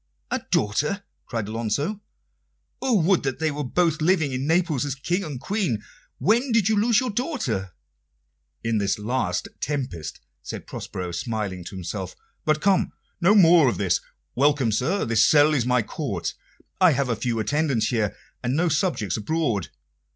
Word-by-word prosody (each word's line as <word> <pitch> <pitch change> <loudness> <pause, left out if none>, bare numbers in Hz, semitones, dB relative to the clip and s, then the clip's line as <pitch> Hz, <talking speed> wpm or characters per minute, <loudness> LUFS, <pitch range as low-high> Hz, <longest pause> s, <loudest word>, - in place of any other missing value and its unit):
"A - - +1
daughter?" 150 - +1 0.2
cried 115 -5 -3
Alonso. 115 - -2 0.8
"Oh, 245 -6 +3
would 185 +2 +3
that 135 -2 -2
they 160 +2 0
were 145 0 -3
both 160 +3 +1
living 160 -3 +2
in 130 +2 -2
Naples 165 -5 +2
as 140 -2 -2
King 175 +8 -1
and 145 -7 -5
Queen! 180 - -1 0.3
When 240 +6 +2
did 225 -4 +3
you 220 - +3
lose 220 +1 +4
your 255 -3 -1
daughter?" 145 - -2 0.9
"In 115 -1 +1
this 100 -1 0
last 105 -4 -1
tempest," 125 - -4 0.2
said - - -7
Prospero, 90 -1 -6
smiling 100 -1 -3
to 95 - -8
himself. 95 0 -5 0.3
"But 155 0 +2
come, 195 -2 +2 0.3
no 190 +5 +5
more 170 -7 +7
of - - -2
this. 95 -4 +1 0.3
Welcome, 140 -3 +3
sir; 165 - 0
this 115 -1 +3
cell 150 +4 +5
is 125 -5 +1
my 125 -2 +3
court. - - -3 0.5
I 180 -4 +6
have 130 -3 0
few 115 0 -1
attendants 135 -2 +1
here, 110 -4 0 0.3
and 125 +1 -1
no 170 +3 +2
subjects 145 - 0
abroad. 115 - -1
140 Hz, 160 wpm, -24 LUFS, 110-175 Hz, 0.9 s, more